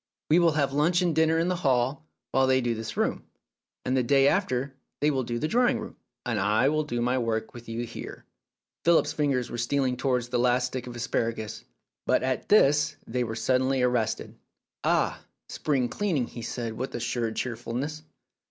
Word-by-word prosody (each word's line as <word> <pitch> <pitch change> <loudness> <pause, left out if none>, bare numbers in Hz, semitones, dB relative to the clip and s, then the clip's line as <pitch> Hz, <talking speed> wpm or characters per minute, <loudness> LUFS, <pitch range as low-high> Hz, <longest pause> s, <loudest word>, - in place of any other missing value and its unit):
We 165 - +6
will 170 -2 +4
have 140 -2 +1
lunch 170 +5 +3
and 175 -2 +1
dinner 160 0 +3
in 165 +1 +1
the 180 0 0
hall 135 0 0 0.2
while 135 0 +3
they 130 0 +4
do 120 -2 0
this 110 0 -6
room, - - 0 0.6
and 130 - +1
the 130 - +3
day 135 +2 +4
after 135 -7 0 0.3
they 150 +1 +3
will 135 -2 0
do 120 -1 -3
the 155 - -1
drawing 245 +4 +2
room, 220 - -8 0.3
and 115 -4 0
I 105 +7 +3
will 155 +1 +1
do 120 -5 -3
my 125 +2 +1
work 110 -2 -2
with 120 -1 -11
you 115 +1 -3
here." 115 - -9 0.6
Philip's 170 0 +4
fingers 140 -5 0
were 120 - -4
stealing 130 +1 +1
towards 125 -2 0
the 125 -1 0
last 125 +1 +3
stick 125 0 -5
of 120 - -7
asparagus, 115 -2 -2 0.4
but - - +3
at 130 0 -2
this 150 -7 +4
they 125 +2 -1
were 110 -2 -4
suddenly 130 +2 +1
arrested. 120 -3 0 0.5
"Ah, - - +1 0.3
spring 135 -5 0
cleaning!" 165 -6 -1
he 120 - -9
said 115 -1 -4
with 130 +4 -5
assumed 115 -1 -2
cheerfulness. 130 +5 -3
130 Hz, 190 wpm, -27 LUFS, 120-150 Hz, 0.6 s, We